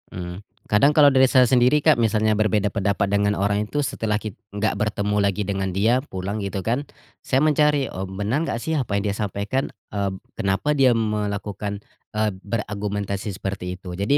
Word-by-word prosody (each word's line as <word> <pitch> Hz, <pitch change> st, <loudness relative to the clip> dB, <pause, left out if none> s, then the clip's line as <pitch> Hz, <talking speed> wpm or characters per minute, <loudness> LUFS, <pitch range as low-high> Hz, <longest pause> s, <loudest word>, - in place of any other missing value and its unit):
Mmm. 90 Hz, 0 st, -6 dB, 0.3 s
Kadang 140 Hz, +9 st, +3 dB
kalau 145 Hz, -2 st, +7 dB
dari 130 Hz, -1 st, +5 dB
saya 130 Hz, -1 st, +6 dB
sendiri, 125 Hz, +3 st, +4 dB
Kak, 155 Hz, +1 st, +5 dB
misalnya 110 Hz, -1 st, +2 dB
berbeda 105 Hz, -1 st, +1 dB
pendapat 100 Hz, 0 st, +1 dB
dengan 100 Hz, 0 st, +2 dB
orang 100 Hz, +1 st, 0 dB
itu 145 Hz, +2 st, 0 dB
setelah 110 Hz, -4 st, -1 dB
kit 105 Hz, -1 st, -6 dB, 0.2 s
enggak 105 Hz, +2 st, -1 dB
bertemu 105 Hz, 0 st, -1 dB
lagi 100 Hz, +1 st, 0 dB
dengan 95 Hz, -1 st, -2 dB
dia, 110 Hz, +7 st, +2 dB
pulang 100 Hz, -4 st, -5 dB
gitu 100 Hz, -1 st, -4 dB
kan. 120 Hz, +5 st, +1 dB, 0.4 s
Saya 130 Hz, -, 0 dB
mencari, 150 Hz, -2 st, +3 dB
"Oh, 95 Hz, 0 st, -5 dB
benar 105 Hz, +9 st, -1 dB
enggak 115 Hz, -, -2 dB
sih 160 Hz, -, -2 dB
apa 125 Hz, -9 st, 0 dB
yang 100 Hz, -, -2 dB
dia 100 Hz, -, 0 dB
sampaikan?" 105 Hz, +5 st, -2 dB, 0.2 s
eb 100 Hz, -2 st, -1 dB, 0.2 s
"kenapa 100 Hz, +7 st, +1 dB
dia 135 Hz, -3 st, +4 dB
melakukan," 105 Hz, -2 st, -2 dB, 0.4 s
eee, 110 Hz, -1 st, +1 dB
"beragumentasi 100 Hz, -2 st, -3 dB
seperti 90 Hz, -2 st, -4 dB
itu." 90 Hz, -1 st, -8 dB
Jadi 100 Hz, +10 st, +1 dB
105 Hz, 180 wpm, -23 LUFS, 100-120 Hz, 0.4 s, kalau